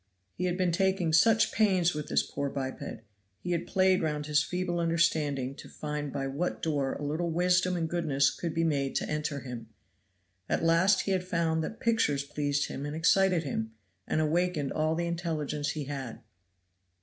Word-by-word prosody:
He 180 - -3
had 180 0 0
been 185 -2 +2
taking 185 -2 +1
such 225 +7 +5
pains 185 -5 +3
with 150 -1 -4
this - - +2
poor 140 0 -3
biped; 135 -3 -5 0.4
he 180 - -4
had 170 -1 -1
played 190 -1 +3
round 150 -2 -1
his 150 -1 +3
feeble 180 +1 -2
understanding 155 -5 +1
to - - -12
find 150 -1 -4
by 135 0 -3
what 140 +7 -2
door 145 -4 -1
a - - -6
little 155 +4 -1
wisdom 180 +2 +2
and 165 -1 -1
goodness 150 -5 +1
could 170 - -4
be 165 - +2
made 140 -4 0
to - - 0
enter 150 -2 -2
him. 120 -3 -7 0.8
At - - 0
last 170 +4 +4
he 195 - -2
had 185 -1 +1
found 165 -3 0
that 220 - -6
pictures 225 -12 +1
pleased 145 0 -1
him 135 - -6
and 145 +1 -4
excited 180 +1 +3
him, 110 -6 -3 0.3
and - - 0
awakened 155 -2 0
all 155 +1 0
the 170 +1 -1
intelligence 160 -4 -2
he 155 - -3
had. 135 -4 -6
160 Hz, 185 wpm, -29 LUFS, 145-175 Hz, 0.8 s, such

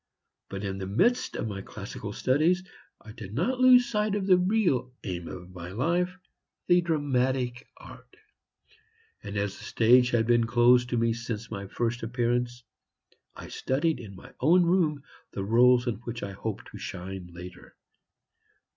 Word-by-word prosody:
But 95 +1 -6
in 95 -1 -3
the 95 - -4
midst 240 - +1
of - - -3
my 100 -2 -5
classical - - -8
studies 160 +8 +1 0.4
I 110 - -12
did 110 -2 -9
not 250 - 0
lose 255 -1 +7
sight 210 -3 0
of 200 -2 -1
the 190 -1 +6
real 180 - +1
aim 90 -4 -5
of 90 0 -9
my 85 -1 -8
life, 175 - -1 0.5
the 175 0 +4
dramatic 130 -6 -1
art; - - -14 1.0
and 100 0 -6
as 100 0 -2
the - - -12
stage 125 +2 +4
had 120 -2 +1
been 120 0 +3
closed 120 +1 +4
to 120 - -1
me 115 0 +2
since 115 -1 -6
my 100 -2 -5
first 120 +4 -2
appearance, 120 +1 -1 0.7
I - - -10
studied 155 +5 -1
in 100 -4 -10
my 95 - -14
own 175 +7 +5
room 165 -5 +1 0.3
the 95 - -3
roles 120 +4 +4
in 120 -3 -2
which 120 0 -7
I 100 - -4
hoped 100 +1 -6
to - - -10
shine 95 -1 -7
later. 90 +1 -11
120 Hz, 165 wpm, -27 LUFS, 105-160 Hz, 1.0 s, lose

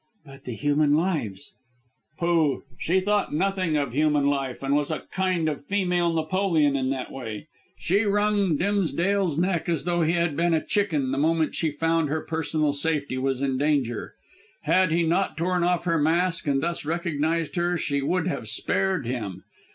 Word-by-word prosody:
"But 135 -1 -14
the 125 - -4
human 145 +3 +2
lives 150 - -2 0.3
" 115 -3 -44
"Pooh! 165 -5 +1 0.2
She 185 +3 +1
thought 205 -4 0
nothing 185 -2 0
of 140 -5 -2
human 150 0 +2
life, 135 -2 -1
and 135 +1 0
was 145 -1 0
a 155 - -3
kind 185 -3 0
of 145 -2 -3
female 180 -3 +1
Napoleon 160 -2 +1
in 130 -1 0
that 135 -1 -3
way. 120 0 -6 0.3
She 195 +4 +1
wrung 205 -4 +2
Dimsdale's 195 -2 0
neck 175 0 0
as 165 -4 0
though 175 -1 0
he 165 +1 +2
had 170 -3 0
been 170 +1 +2
a 160 - -1
chicken 155 -11 0
the 135 - -1
moment 160 +1 +1
she 160 - 0
found 165 +1 0
her 155 +2 -1
personal 155 -2 -1
safety 145 -3 -1
was 135 0 -1
in 135 -2 0
danger. 140 -6 -1 0.5
Had 185 -2 +3
he 170 +1 +2
not 170 +1 0
torn 180 +1 0
off 175 0 +1
her 170 -2 +1
mask 165 +2 +1
and 140 -1 +1
thus 170 0 -2
recognised 165 0 -1
her 175 0 +1
she 140 -3 -1
would 170 +4 0
have 180 - -3
spared 190 -7 0
him. 105 -7 -4
160 Hz, 180 wpm, -25 LUFS, 140-175 Hz, 0.5 s, Had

